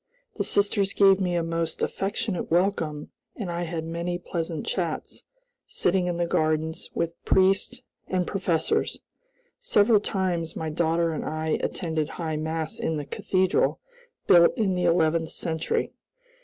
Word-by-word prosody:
The - - 0
sisters 200 -1 +2
gave 195 -1 +5
me 180 -1 0
a 170 - +1
most 165 -1 -2
affectionate 195 -1 -2
welcome 165 -4 0 0.2
and 195 -6 -4
I 170 0 -2
had 160 -1 -4
many 170 +2 -3
pleasant 165 -2 -4
chats, 170 -4 -3 0.5
sitting 180 0 +1
in 175 -1 -1
the 175 - +1
gardens, 155 -1 0
with 170 0 0
the 170 - -39
priests 195 +6 +3 0.2
and 185 -1 0
professors. 170 -5 0 0.6
Several 220 - +4
times 180 -5 -2
my 160 -1 -3
daughter 165 +1 +1
and 155 - -3
I 155 0 -1
attended 160 -3 -2
High 160 -3 -2
Mass 160 0 -3
in 160 - -1
the 145 - -4
cathedral, 185 +4 +1 0.5
built 170 +6 +6
in 205 -5 +1
the 180 -1 0
eleventh 165 -1 +2
century. 160 -2 -2
170 Hz, 145 wpm, -26 LUFS, 160-190 Hz, 0.6 s, built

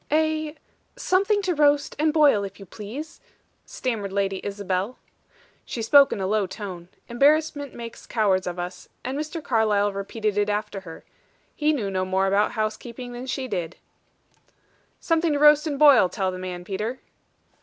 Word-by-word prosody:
"A 310 0 +1 0.4
Something 400 +2 +1
to 370 -2 +1
roast 290 -2 +2
and 310 +1 +3
boil, 295 -10 +4
if 195 0 -8
you 195 - -10
please," 230 - -8 0.5
stammered 220 -6 -3
Lady 195 -1 -1
Isabel. 200 +2 -3 0.7
She 230 - -5
spoke 280 +4 +6
in - - -2
a 190 - -1
low 205 0 +1
tone. 185 -3 -7 0.2
Embarrassment 285 +2 +2
makes 230 -1 -9
cowards 195 -5 +1
of 180 0 -4
us; 180 +1 -6
and 260 +2 -3
Mr. 310 +2 -4
Carlyle 210 -4 +2
repeated 205 +1 -2
it 205 0 +1
after 210 -1 -2
her. 165 -4 -11 0.5
He 300 0 +2
knew 220 -10 -2
no 185 -1 0
more 190 +1 +1
about 200 +2 +2
housekeeping 235 +3 -4
than 245 +2 -7
she 260 0 -3
did. 180 -6 -4 1.2
"Something 330 -1 +1
to - - +1
roast 300 +1 +6
and 290 -2 -2
boil, 280 -10 +7
tell 190 -3 -1
the 185 - -7
man, 180 -1 -6
Peter." 210 +6 -3
220 Hz, 165 wpm, -24 LUFS, 195-290 Hz, 1.2 s, boil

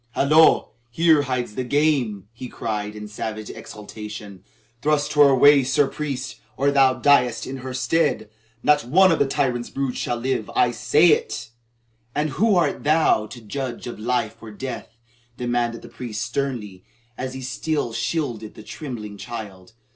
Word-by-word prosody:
"Hollo! 155 +3 +5 0.2
Here 160 +3 +4
hides 125 -5 -2
the 130 - -3
game!" 125 -8 +1
he 120 +2 -8
cried 105 -3 -4
in 105 0 -7
savage 110 0 -5
exultation. 105 -2 -9 0.4
"Thrust 150 -1 +1
her 145 -1 +7
away, 140 +2 +6
Sir 135 +2 +2
Priest, 135 -3 -5 0.2
or 140 +2 +2
thou 135 -2 +4
diest 125 -2 +3
in 135 - -5
her 130 0 -6
stead. 130 -2 0 0.4
Not 150 0 +4
one 185 +9 +5
of 165 - +1
the 140 - +3
tyrant's 125 -4 -1
brood 135 -2 -2
shall 120 - -2
live. 120 -2 -2
I 120 - +4
say 145 +8 +4
it!" 135 - -1 0.6
"And 150 0 0
who 215 +8 +2
art 175 - +1
thou 150 -8 +3
to 120 - -10
judge 125 +2 -5
of 120 - -7
life 110 -1 -1
or 115 - -9
death?" 115 +1 -7 0.4
demanded 120 -1 -1
the - - -9
priest 115 -2 -5
sternly, 115 -7 -4 0.3
as 130 +1 -5
he 130 - -6
still 135 -1 -2
shielded 115 -2 -3
the - - -11
trembling 110 -6 -7
child. 105 -4 -8
125 Hz, 160 wpm, -23 LUFS, 110-145 Hz, 0.6 s, her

